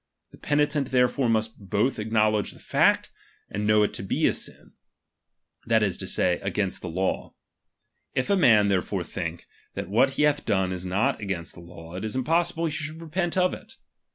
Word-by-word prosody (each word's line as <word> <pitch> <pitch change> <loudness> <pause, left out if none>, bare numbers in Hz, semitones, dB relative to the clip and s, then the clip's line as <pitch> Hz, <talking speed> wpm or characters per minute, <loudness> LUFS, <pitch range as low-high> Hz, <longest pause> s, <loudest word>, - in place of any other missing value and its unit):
The - - -15
penitent 145 -2 +1
therefore 125 0 +2
must 110 0 0
both 110 +6 +1
ac 105 +1 -4
knowledge 110 -1 +2
the - - -16
fact, - - +2 0.4
and 105 +1 -2
know 105 0 +5
it 105 - 0
to - - -5
be 95 - 0
a - - +4
sin, - - -6 1.0
that 110 -1 +3
is 95 -4 +1
to - - -5
say, 90 -1 +1
against 95 0 -2
the 90 - -5
law. 95 +3 -2 0.8
If 130 +8 0
a - - +5
man 110 - +5
therefore 95 -1 0
think, 85 -2 -5 0.3
that - - -5
what 130 +6 +3
he 150 - +1
bath 145 -1 +2
done 95 -4 +1
is 90 0 -5
not 95 +5 +1
against 95 -5 -4
the - - -13
law, 85 -1 -12
it 95 +3 -5
is 110 +1 -3
impossible 165 +5 +1
he 160 - -1
should 155 +1 -4
repent 170 +2 -2
of 185 0 +3
it. - - -10
110 Hz, 195 wpm, -26 LUFS, 95-140 Hz, 1.0 s, know